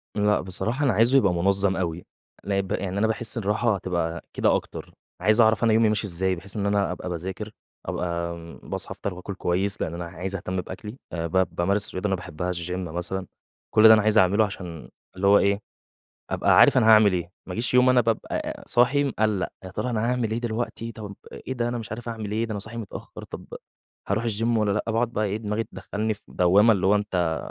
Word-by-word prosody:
لأ 105 0 +2
بصراحة 110 +9 -2
أنا 130 - +3
عايزه 115 +6 +4
يبقى 100 -9 +3
مُنظَّم 95 +2 +2
أوي، 85 -2 -3 0.4
لأ 100 +1 0
ب 95 -1 -4
يعني 95 0 -2
أنا 110 +2 +2
باحس 110 +1 -2
الراحة 110 +1 +1
هتبقى 85 -3 -2
كده - - +2
أكتر، - - -6 0.3
عايز 110 +5 +4
أعرف 110 -1 +3
أنا 115 -1 +4
يومي 110 0 +4
ماشي 105 0 0
إزاي 95 +1 0
بحيث 100 +5 -7
إن 100 - -1
أنا 100 -1 +1
أبقى - - -5
باذاكر 95 +5 -5 0.3
أبقى 85 -1 -2 0.3
باصحى - - -5
أفطَر 100 - -4
وآكُل 90 +3 -7
كويس 95 +3 0
لأن 80 - -2
أنا 85 0 -5
عايز 90 +3 -5
أهتم 95 0 -3
بأكلي، 105 +6 -9 0.2
آآ 85 -1 -2
ب 95 +2 0
بامارس 100 +4 +1
رياضة 95 +3 -1
أنا 95 - +1
باحبها 90 -1 -4
الgym 85 0 -4
مثلًا، 90 +1 -3 0.5
كلّ 110 +1 +8
ده 110 - +10
أنا 110 - +5
عايز 110 +1 +2
أعمله 100 +2 +5
عشان 90 -5 -8 0.3
اللي 95 +1 0
هو 100 +1 +7
إيه، 100 0 +2 0.7
أبقى - - +3
عارف - - +7
أنا - - +3
هاعمل 110 -2 +7
إيه، 85 -1 -2 0.2
ما 90 - -6
اجيش 115 +6 -1
يوم 125 0 +6
أنا 125 -1 +5
بابقى 115 -2 -2
صاحي 135 +4 +3
مقلّق، 110 -7 0 0.2
يا 95 - -7
ترى 125 +7 -3
أنا 115 -2 -1
هاعمل 125 -3 0
إيه 115 - 0
دلوقتي، 115 0 -3
طَب 105 -2 -8 0.2
أ - - -9
إيه - - -2
ده 120 -1 -1
أنا 120 0 -2
مش 110 -3 -7
عارف 120 +1 -6
أعمل 110 -3 -5
إيه، 110 +2 0
ده 115 - -6
أنا 105 - -2
صاحي 110 +4 -6
متأخّر، 110 -4 -8
طَب - - -9 0.6
هارُوح 110 +4 0
الgym 115 +1 0
والَّا 105 -1 +1
لأ، 105 - -1
باقعد 115 +2 +1
بقى 110 - 0
إيه، 100 0 -1
دماغي 110 +1 -2
تدخّلني 110 +1 -3
في 105 - -21
دوّامة 100 +6 +4
اللي 95 -2 0
هو 100 - +5
أنت 90 -6 0
100 Hz, 220 wpm, -25 LUFS, 90-110 Hz, 0.7 s, ده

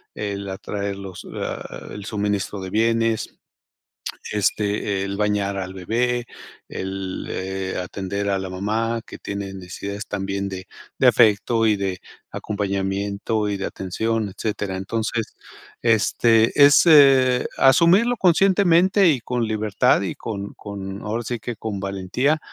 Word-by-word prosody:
el 100 -1 -4
atraer 100 +1 -4
los 95 -2 -9
ah, - - -6
el 105 - -8
suministro 105 -1 -2
de 95 0 -6
bienes. 115 0 +1 0.9
Este, 105 -1 0
el 100 0 -4
bañar 105 -1 0
al 95 -1 -4
bebé, 120 +6 -1 0.4
el, 95 0 -5
eh, 95 0 -4
atender 100 +2 -3
a 100 -1 +1
la 95 0 -5
mamá 110 +5 -1
que - - -10
tiene 100 -1 -5
necesidades 100 +2 -7
también 100 0 -3
de 95 -1 -7 0.3
de - - +4
afecto 115 +1 +4
y 105 - +4
de 95 -2 -3 0.3
acompañamiento 100 +1 -2
y 100 - -2
de 95 - -3
atención, 110 +3 -2
etcétera. 100 -1 -3
Entonces, 110 +3 -3 0.5
este 115 0 +3
es, 145 +4 +6
eh, 135 -5 +6
asumirlo 180 - +5
conscientemente 190 0 +4
y 140 -5 +2
con 120 0 -1
libertad 110 +2 +2
y 95 - -3
con 100 -3 -6
con 100 -1 -7
ahora 110 +3 -2
sí 120 +1 -4
que 120 +2 -5
con 105 -3 -4
valentía, 100 +10 0
105 Hz, 135 wpm, -22 LUFS, 95-115 Hz, 0.9 s, es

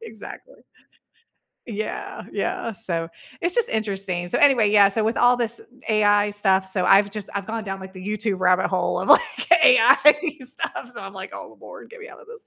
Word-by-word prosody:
Exactly. - - -11 1.1
Yeah, 215 -2 -6
yeah, 230 - -3
so 170 -6 -4 0.3
it's 345 +1 0
just 475 -1 +3
interesting. 195 -5 -3
So, - - -1
anyway, 250 -8 +4
yeah, 205 -2 +5
so 215 +2 -1
with 225 - -1
all 245 0 +4
this 235 -1 -2 0.3
AI 205 -1 +2
stuff, 195 -2 0
so 190 -1 -2
I've 200 +1 +4
just 210 -1 -5
I've 195 -1 -4
gone 225 0 -5
down, 195 -1 -5
like, 190 0 -11
the 185 0 -11
YouTube 210 -2 -3
rabbit 185 0 +2
hole 185 -1 -1
of, - - -5
like, - - +3
AI 340 -9 +5
stuff, 255 0 -6
so 245 -4 -9
I'm 195 0 -9
like, 190 0 -9
"Oh - - -11
lord, - - -13
get 475 0 -14
me 450 - -11
outta 475 - -15
this." 465 0 -13
210 Hz, 195 wpm, -22 LUFS, 195-245 Hz, 1.1 s, yeah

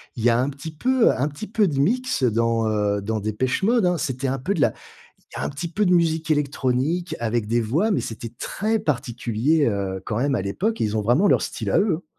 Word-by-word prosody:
y 120 0 +2
a 115 +1 +3
un 130 - +1
petit 145 +3 -8
peu 255 +8 +3
un 140 - 0
petit 150 +9 -7
peu 210 -1 +2
de 145 - -2
mix 245 - +1
dans, 115 -1 +2
heu, 105 -1 0
dans 110 +2 -2
Depeche 110 - -1
Mode, 230 0 +3
hein. 180 -1 +2
C'était 135 -3 -2
un 135 0 -1
peu 185 +10 -1
de 160 - -1
la - - +3 0.6
il - - -8
y - - -3
a - - -2
un - - -1
petit 150 +5 -5
peu 205 +5 0
de 180 - +2
musique 165 -2 +1
électronique 145 +3 0
avec 115 -1 -1
des 120 +2 +1
voix, 155 - +1
mais 195 - +2
c'était 115 0 -6
très 220 +2 -1
particulier, 125 - 0
heu, 95 -3 -2
quand 105 - -3
même 140 +2 +1
à 115 - -1
l'époque 195 - -2
et - - +3
ils 105 +1 -2
ont 105 - +1
vraiment 125 - +3
leur - - +4
style - - -4
à - - +4
eux. 185 -4 0
135 Hz, 245 wpm, -23 LUFS, 115-175 Hz, 0.6 s, leur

